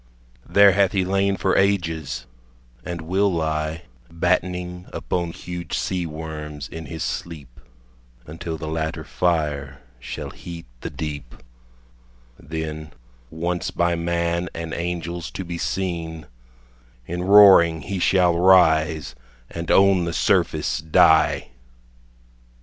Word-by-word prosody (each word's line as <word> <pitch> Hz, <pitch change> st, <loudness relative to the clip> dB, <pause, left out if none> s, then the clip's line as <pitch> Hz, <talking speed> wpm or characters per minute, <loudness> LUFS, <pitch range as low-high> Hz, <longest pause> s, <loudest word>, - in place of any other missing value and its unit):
There 100 Hz, 0 st, +7 dB
hath 95 Hz, 0 st, +2 dB
he 95 Hz, -2 st, +1 dB
lain 100 Hz, +1 st, +1 dB
for 95 Hz, -, +1 dB
ages, 80 Hz, -10 st, 0 dB, 0.6 s
and 85 Hz, -1 st, -5 dB
will 95 Hz, +5 st, +1 dB
lie 80 Hz, 0 st, -2 dB, 0.3 s
Battening 90 Hz, +1 st, -1 dB
upon 85 Hz, -2 st, -3 dB
huge 85 Hz, -2 st, -6 dB
sea 90 Hz, -2 st, -2 dB
worms 75 Hz, -2 st, -7 dB
in 80 Hz, 0 st, -8 dB
his 80 Hz, -2 st, -5 dB
sleep, 75 Hz, -8 st, -6 dB, 0.7 s
Until 80 Hz, +1 st, -6 dB
the 80 Hz, -, -6 dB
latter 80 Hz, 0 st, -3 dB
fire 75 Hz, -5 st, -1 dB, 0.2 s
shall 60 Hz, -, -6 dB
heat 85 Hz, -1 st, -9 dB
the -, -, -5 dB
deep; 70 Hz, -5 st, -6 dB, 1.0 s
Then 80 Hz, 0 st, -6 dB, 0.4 s
once 85 Hz, +3 st, -2 dB
by 85 Hz, 0 st, +1 dB
man 85 Hz, +1 st, -1 dB
and 80 Hz, -1 st, -5 dB
angels 85 Hz, 0 st, -4 dB
to 95 Hz, -, -6 dB
be 85 Hz, 0 st, -5 dB
seen, 85 Hz, -5 st, -3 dB, 0.8 s
In 90 Hz, +6 st, -4 dB
roaring 95 Hz, -4 st, +7 dB
he 95 Hz, +5 st, -4 dB
shall 90 Hz, -1 st, +3 dB
rise 80 Hz, -4 st, +4 dB, 0.4 s
and 85 Hz, 0 st, -6 dB
on 95 Hz, -2 st, +5 dB
the 85 Hz, -, -3 dB
surface -, -, +1 dB
die. 80 Hz, -3 st, +3 dB
85 Hz, 115 wpm, -22 LUFS, 80-90 Hz, 1.0 s, There